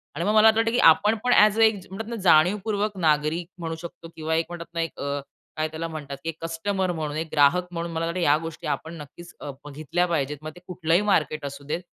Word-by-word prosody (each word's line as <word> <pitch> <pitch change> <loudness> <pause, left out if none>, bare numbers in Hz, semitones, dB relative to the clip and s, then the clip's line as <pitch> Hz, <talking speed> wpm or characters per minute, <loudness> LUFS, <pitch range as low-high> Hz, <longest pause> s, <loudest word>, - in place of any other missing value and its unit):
आणि 170 - -2
मग 210 - +2
मला 215 0 +7
आतं 220 0 +5
वाटतं 225 0 +2
की 245 - +1
आपण 210 +7 +2
पण 250 - +3
ॲज 210 +1 +5
अ - - +4
एक 220 -2 +4
ज - - -16
म्हणतात 220 +3 -6
ना 235 - -4
जाणीवपूर्वक 200 +5 +3
नागरिक 155 +1 +1
म्हणू 165 -1 -4
शकतो 170 -1 -9
किंवा 160 0 -2
एक 165 - +1
म्हणतात 170 -1 -8
ना 170 - -1
एक 165 - -5
अ, 140 0 -2 0.4
काय 155 0 0
त्याला 160 +1 -5
म्हणतात 150 -4 -7
की 165 - -3
एक 165 - -6
कस्टमर 185 +3 -1
म्हणून 155 -3 -4
एक 160 +1 -3
ग्राहक 155 +5 +3
म्हणून 170 0 -4
मला 165 0 -2
वाटतं 170 +2 -3
की 175 - +1
या 145 +1 +5
गोष्टी 165 0 -7
आपण 150 +3 -3
नक्कीच 170 +4 -12
अ, 145 - -5
बघीतल्या 150 +4 -1
पाहिजेत. 150 -4 -1
मग 155 0 -6
ते 175 - -12
कुठलंही 175 0 +1
मार्केट 155 -7 0
असू 140 0 -7
देत, 150 +4 -3
165 Hz, 250 wpm, -25 LUFS, 155-185 Hz, 0.4 s, मला